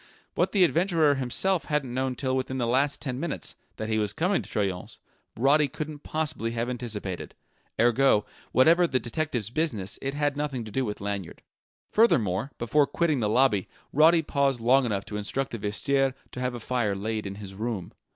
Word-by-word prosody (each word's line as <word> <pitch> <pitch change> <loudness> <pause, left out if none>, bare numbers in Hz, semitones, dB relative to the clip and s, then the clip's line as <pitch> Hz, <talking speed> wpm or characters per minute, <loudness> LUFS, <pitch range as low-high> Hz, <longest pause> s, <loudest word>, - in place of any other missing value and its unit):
What - - +1
the 195 -3 +4
adventurer 165 -3 +3
himself 140 +8 0
hadn't 145 -5 -1
known 130 0 -1
till 130 0 -1
within 130 0 -2
the 120 - 0
last 135 +4 +1
ten 130 -3 -3
minutes, 170 - -3 0.2
that 110 - -4
he 110 0 +1
was 105 -1 0
coming 185 +4 +1
to - - -12
Troyon's, 95 -4 -3 0.4
Roddy 140 +5 +4
couldn't 150 +2 -6
possibly 155 -8 -2
have 120 +2 -1
anticipated; 105 -7 -4 0.4
ergo, 120 -1 +4 0.3
whatever 165 +7 +5
the 130 - +1
detective's 120 -4 -2
business, 120 - -1
it 135 +1 -3
had 145 -1 0
nothing 145 -4 -2
to 110 - -9
do 135 +6 0
with 105 -4 -4
Lanyard. 100 -3 -5 0.5
Furthermore, 115 - +3
before 140 +5 +2
quitting 160 -5 +1
the 105 -3 0
lobby, 115 -4 +3 0.2
Roddy 160 +3 +5
paused 140 -3 +1
long 125 +3 +4
enough 100 -3 -2
to 105 - -5
instruct 125 +6 -2
the 115 - -5
vestiaire 130 +6 0 0.2
to - - -7
have 125 -1 -1
a - - -5
fire 115 -3 -1
laid 110 +1 -3
in 100 - -6
his 100 -1 -8
room. 105 -3 -4
125 Hz, 185 wpm, -27 LUFS, 110-145 Hz, 0.5 s, whatever